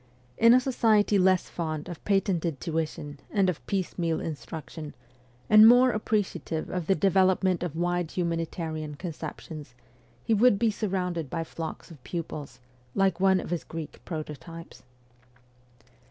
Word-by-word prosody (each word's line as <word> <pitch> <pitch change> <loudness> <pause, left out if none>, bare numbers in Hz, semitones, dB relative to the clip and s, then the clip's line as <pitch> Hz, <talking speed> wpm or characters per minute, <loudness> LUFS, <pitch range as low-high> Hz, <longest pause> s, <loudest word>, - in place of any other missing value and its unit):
In 230 +2 +6
a - - +6
society 220 -5 +3
less 185 -1 +3
fond 155 -3 -4
of 175 -3 -8
patented 180 -7 0
tuition 155 -3 -3
and 195 -3 +2
of 160 - -11
piecemeal 175 -4 -1
in 160 - -3
struction, 150 0 -8 0.5
and 215 +1 +9
more 245 +2 +7
appreciative 205 -7 -2
of 180 -3 -3
the 195 - +4
development 185 0 +3
of 175 -4 -3
wide 175 0 0
humanitarian 165 -3 -3
conceptions, 155 -4 -7 0.5
he 225 - +1
would 220 0 +5
be 225 +1 +2
sur 215 +1 -3
rounded 180 -5 -2
by 165 - -2
flocks 165 +1 -7
of 145 -6 -14
pupils, 150 -7 -6 0.4
like 195 -1 +2
one 190 0 +4
of - - -6
his 175 - -1
Greek 160 -2 -8
prototypes. 165 +1 -8
175 Hz, 140 wpm, -27 LUFS, 160-195 Hz, 0.5 s, and